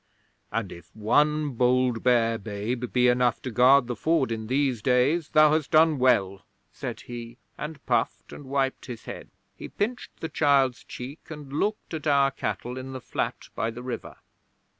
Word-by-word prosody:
"And 115 -5 -2
if 85 0 -12
one 150 +7 +2
bold, 125 -1 +2
bare 115 -2 +2
babe 110 +4 -4
be 125 0 +3
enough 125 0 +2
to 130 - -4
guard 125 +4 +5
the 120 0 -4
Ford 155 -1 +1
in 110 -1 -4
these 130 -2 0
days, 135 +7 +2
thou 155 -1 +5
hast 155 -2 0
done 155 -2 +4
well," 100 -7 +2 0.3
said - - -6
he, 120 0 -8 0.2
and 150 -1 -7
puffed - - -1
and 145 - -10
wiped 135 0 -1
his 120 -3 -8
head. - - -8 0.3
'He - - -9
pinched 245 +4 -4
the 160 - -3
child's 140 -4 +2
cheek, 130 +5 -9
and 150 -3 -9
looked 205 +5 -2
at 155 -1 -4
our 140 -1 +4
cattle 125 -1 -4
in 130 +1 -7
the 130 - -5
flat - - -4
by 115 - -1
the 120 +2 -8
river. 125 -2 -6
130 Hz, 175 wpm, -26 LUFS, 120-145 Hz, 0.3 s, guard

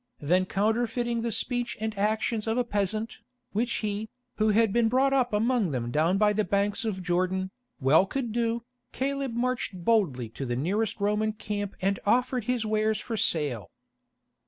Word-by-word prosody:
Then 180 +5 +2
counterfeiting 230 +4 0
the 235 0 -1
speech 245 +2 -2
and 220 0 -3
actions 215 +2 0
of 225 +2 0
a 250 - +3
peasant, 215 0 -2 0.3
which 235 +4 0
he, 210 +1 -3 0.3
who 215 0 +3
had 215 -1 +3
been 235 -1 +3
brought 265 +3 +3
up 255 -2 +2
among 220 -1 +2
them 120 -4 -2
down 160 +7 +2
by 210 0 +4
the 215 +1 +1
banks 200 +4 0
of 190 -4 -2
Jordan, 185 +1 0 0.3
well 155 +7 +4
could 245 0 -3
do, 230 0 0 0.3
Caleb 275 -2 -2
marched 240 -7 -2
boldly 170 - +2
to 120 - -7
the 120 -2 -2
nearest 195 - -1
Roman 210 +1 +1
camp 205 -2 -4
and 195 0 +1
offered 245 +2 +1
his 245 -2 0
wares 215 0 +1
for 230 - -4
sale. 145 - 0
215 Hz, 170 wpm, -27 LUFS, 190-235 Hz, 0.3 s, by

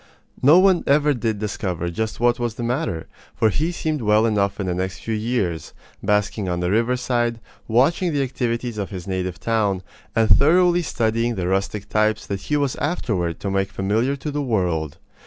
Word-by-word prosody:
No 145 +6 +7
one 185 -1 +4
ever 145 +1 +4
did 115 -4 -1
discover 90 -5 -3
just 110 +5 -3
what 120 +1 +2
was 120 -2 -2
the 120 - -5
matter, 120 - -2 0.3
for 110 - +2
he 155 - 0
seemed 155 -4 -2
well 105 0 +3
enough 100 -2 0
in 100 - -1
the 90 - -1
next 95 +1 -3
few 115 - -3
years, 105 -8 -2 0.3
basking 105 -1 0
on 90 0 -1
the 90 +1 0
riverside, 120 +1 0 0.3
watching 145 +10 +2
the 145 -2 +1
activities 120 -3 -2
of 100 - -3
his 95 -3 -7
native 95 -2 -3
town, 105 -5 0 0.3
and 115 -1 +3
thoroughly 175 +7 +5
studying 115 -5 0
the 90 -3 -2
rustic 95 +2 -1
types 110 0 +1
that 100 -1 -4
he 150 - -1
was 140 -3 0
afterward 105 - -1
to 100 - -2
make 95 0 0
familiar 110 +8 0
to 145 +2 -5
the 145 0 -2
world. 90 - -1
110 Hz, 185 wpm, -22 LUFS, 95-130 Hz, 0.3 s, No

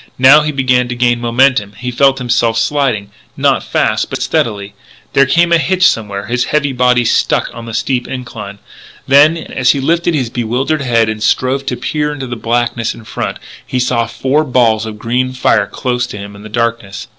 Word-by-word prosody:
Now 135 +4 +7
he 150 0 -1
began 130 -3 +1
to 125 - -4
gain 120 -1 +1
momentum; 120 -3 +2
he 125 0 -4
felt 135 +2 +3
himself 120 -2 0
sliding, 115 -4 0 0.3
not - - +2
fast - - 0
but - - -4
steadily. 100 -3 -1 0.4
There 140 0 +4
came 170 +4 +2
a 170 - +5
hitch 185 +5 +3
somewhere; 105 - -2
his 120 +3 -1
heavy 145 -2 0
body 125 -1 +2
stuck - - +1
on 115 0 -9
the 115 - -7
steep 125 -2 -1
incline. 110 -6 -7 0.5
Then, 145 +4 +5
as 130 -5 0
he 140 - -3
lifted 170 +4 0
his 125 -5 -2
bewildered 125 +6 -1
head 115 -4 +2
and 110 0 -4
strove 130 +5 0
to 125 - -2
peer 150 -1 -2
into 145 -2 -6
the 120 -1 -5
blackness 120 0 -1
in 115 - -13
front, - - -4 0.3
he 130 - -4
saw 125 -2 0
four 130 +6 0
balls 115 -5 +1
of 105 -1 -7
green 125 +4 -1
fire 125 -5 +1
close 125 0 -2
to 105 - -8
him 100 0 -9
in 105 +1 -11
darkness. 110 -4 -2
125 Hz, 190 wpm, -14 LUFS, 115-135 Hz, 0.5 s, Now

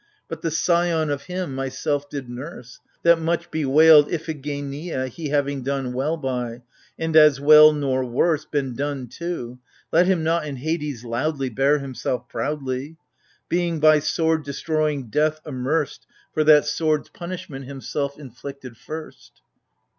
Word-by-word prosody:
But - - -7
the 165 - -1
scion 165 -1 +1
of 140 0 -4
him, 180 -4 -4
myself 140 +2 -2
did 140 -3 -6
nurse 125 0 -9
— - - -41
That 170 -1 +5
much 165 +1 -1
bewailed 155 0 +6
Iphigeneia, 145 -2 -4
he 155 +4 -6
Having 140 -1 0
done 135 -1 -2
well 145 +6 -1
by, 125 -4 -4 0.2
— - - -31
and 160 -1 -2
as 150 -3 +7
well, 155 +1 +8
nor 135 -3 0
worse, 145 +6 +1
Been 140 -5 -2
done 140 -1 -3
to,— 125 -8 -5 0.3
let 175 +2 +4
him 185 -4 +2
not 165 +1 +1
in 140 - -5
Hades 145 -3 -3
loudly 135 +3 -1
Bear 135 +5 +2
himself 130 -3 -4
proudly! 140 +1 -3 0.5
Being 170 -1 0
by 155 0 +6
sword 160 +1 0
destroying 145 -3 -2
death 155 +4 +1
amerced 145 +2 -2 0.3
For 155 - +2
that 150 -1 +7
sword's 155 0 0
punishment 170 -6 -7
himself 140 +1 -4
inflicted 135 -2 -10
first. 155 - -10
145 Hz, 145 wpm, -23 LUFS, 135-160 Hz, 0.5 s, well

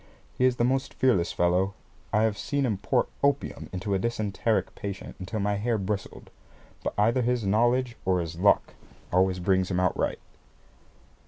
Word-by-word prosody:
He 125 - +2
is 130 -1 +3
the 120 - 0
most 130 +2 0
fearless 115 -10 +2
fellow. 90 +3 +1 0.4
I 105 - +3
have 110 -2 +2
seen 140 +6 -1
him 105 -6 -1
pour 125 +4 +1 0.2
opium 140 0 0
into 95 +2 -3
a 95 - +2
dysenteric 110 0 -1
patient 100 -1 -6
until 95 +4 -4
my 100 0 0
hair 115 +2 0
bristled. 100 0 -4 0.5
But - - -2
either 115 +5 +3
his 120 -2 0
knowledge 120 +4 +2
or 95 -2 +2
his 85 0 -5
luck 100 +2 +3 0.4
always 95 0 +3
brings 95 +1 +1
him 90 -2 0
out 90 -1 +2
right. - - -1
105 Hz, 170 wpm, -27 LUFS, 95-120 Hz, 0.5 s, is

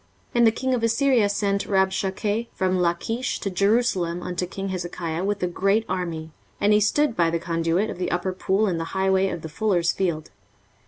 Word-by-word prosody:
23:036:002 - - -36
And 235 -1 +5
the - - +5
king 260 +3 -1
of 245 - 0
Assyria 230 -1 +3
sent 200 -1 0
Rabshakeh 195 +3 0
from 185 -1 +1
Lachish 180 +8 -1
to 195 - -2
Jerusalem 190 -4 +1
unto 180 0 -3
king 195 +2 -5
Hezekiah 175 -2 -3
with 200 -1 -1
a - - +2
great 195 +5 +1
army. 165 -4 -3 0.3
And 205 +1 +3
he 210 - +5
stood 245 +5 +2
by 170 -1 +3
the 170 - 0
conduit 165 +4 0
of - - -8
the 180 - -1
upper 180 +1 -1
pool 195 +3 +1
in 180 -5 -1
the 165 - -3
highway 190 0 +3
of 170 - -5
the - - -4
fuller's 175 0 +1
field. 170 -5 -2
190 Hz, 200 wpm, -24 LUFS, 175-210 Hz, 0.3 s, And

